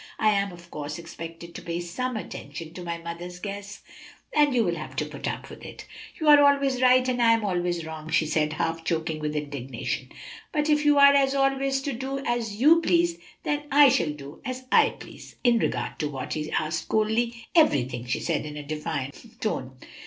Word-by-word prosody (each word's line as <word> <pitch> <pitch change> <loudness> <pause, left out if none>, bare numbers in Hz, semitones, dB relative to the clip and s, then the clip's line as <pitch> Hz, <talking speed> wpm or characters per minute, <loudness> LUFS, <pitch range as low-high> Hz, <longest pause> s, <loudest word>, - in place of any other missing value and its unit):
"I 215 - +3
am, 200 -1 0
of 175 -1 -14
course, 150 0 -5
expected 165 0 -9
to - - -8
pay 170 0 -3
some 225 +8 -3
attention 165 -5 -7
to 180 - -8
my 170 -1 -3
mother's 170 +1 -7
guests, 200 +2 -7 0.5
and 295 -1 +5
you 245 -3 +3
will 175 -4 0
have 155 -2 -7
to - - -1
put - - -6
up - - -4
with - - -11
it." - - -9 0.3
"You 315 - -1
are 295 -1 +9
always 280 -2 +3
right 255 0 +5
and 250 -1 0
I 230 -1 +6
am 225 -2 0
always 175 -3 -1
wrong," 160 -1 -7
she 160 0 +2
said, 155 0 0
half 165 +1 -2
choking 160 -1 -1
with 150 0 -3
indignation; 140 -3 -4 0.4
"but 305 -2 +1
if 300 0 +2
you 295 -1 +5
are 280 0 +8 0.2
always 270 0 +1
to 280 - -2
do 265 +3 -4
as 235 -3 -1
you 320 +6 +6
please, 340 0 +2 0.3
I 290 -1 +4
shall 165 - +2
do 145 0 -10
as 255 -1 -5
I - - +6
please." - - -12
"In 240 -2 +4
regard - - -2
to 150 - -1
what?" 135 -3 -5
he 155 0 -3
asked 155 +1 -1
coldly. 225 +2 0
"Everything!" 130 - +3
she 120 - -1
answered 155 -2 -1
in 150 0 -7
a 150 - -6
defiant 150 - -5
tone. 130 - -2
185 Hz, 200 wpm, -26 LUFS, 160-260 Hz, 0.5 s, are